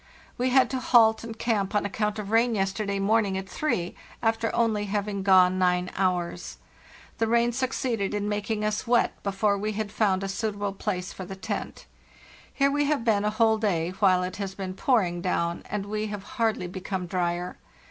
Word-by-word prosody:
We 250 +1 0
had 255 0 +5
to 260 - -1
halt 225 -3 +4
and 225 -1 -7
camp 215 -4 -1
on 210 - +2
account 210 +1 -1
of 210 -1 -5
rain 230 +1 +3
yesterday 200 +1 -1
morning 200 -1 +2
at 190 0 -5
three, 190 - -2 0.3
after 225 0 +1
only 220 -3 +1
having 200 0 -2
gone 185 -1 +5
nine 180 0 +1
hours, 180 -2 -1 0.6
The 225 - +2
rain 235 +1 +3
succeeded 240 -5 -1
in 205 0 -1
making 210 +1 -2
us 215 +3 -2
wet 240 0 +2
before 200 +1 0
we 215 +1 -2
had 210 -1 -3
found 195 -3 +1
a - - -2
suitable 205 -1 -2
place 190 -2 -3
for 190 - -7
the 190 - -7
tent. 205 +1 -5 0.7
Here 275 0 +2
we 290 +1 +1
have 285 -5 0
been 210 -3 +3
a 210 - +2
whole 220 0 +2
day 175 -6 0
while 185 -1 +3
it 180 0 -4
has 195 -2 -4
been 190 -2 -5
pouring 185 -6 +1
down, 170 -2 -1
and 210 -1 -3
we 215 +1 -2
have 205 -2 -6
hardly 225 -3 -1
become 185 +1 -4
drier. 175 0 -2
205 Hz, 190 wpm, -26 LUFS, 190-225 Hz, 0.7 s, had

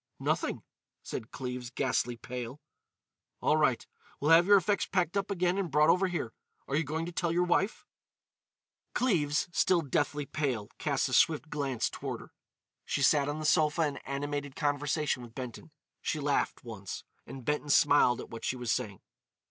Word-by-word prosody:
"Nothing," - - -1 0.4
said 110 - -6
Cleves, 125 -2 -5
ghastly 125 -2 0
pale. 125 +2 -6 0.8
"All - - +3
right. - - +2 0.3
We'll 150 +3 +2
have 170 +2 +7
your 205 0 +8
effects 200 +2 +1
packed 180 -1 0
up 200 0 0
again 180 -1 +1
and 190 -4 -1
brought 150 +1 +5
over 185 +1 +2
here. 170 -11 -3 0.3
Are 140 - -1
you 155 - +2
going 160 +3 -3
to 175 - -5
tell 170 -1 -1
your 175 +1 +2
wife?" 185 +4 0 1.1
Cleves, 160 - +2
still 175 0 +3
deathly 145 -1 0
pale, 130 -9 -2
cast - - +1
a - - -5
swift 155 +5 +3
glance 135 -5 -1
toward - - -5
her. - - -15 0.5
She 140 - -1
sat 145 0 +4
on 145 - -2
the 155 - -4
sofa 155 +1 +3
in 145 -2 -3
animated 145 0 -4
conversation 145 -1 0
with 120 -1 -12
Benton. 130 +3 -7 0.3
She 155 - -1
laughed 145 -1 0
once, 100 -5 -7 0.2
and 135 -3 -9
Benton 150 0 -1
smiled 145 -4 +5
at - - -10
what 115 - -8
she - - -1
was 120 -3 -2
saying. 100 -3 -2
145 Hz, 170 wpm, -30 LUFS, 130-165 Hz, 1.1 s, your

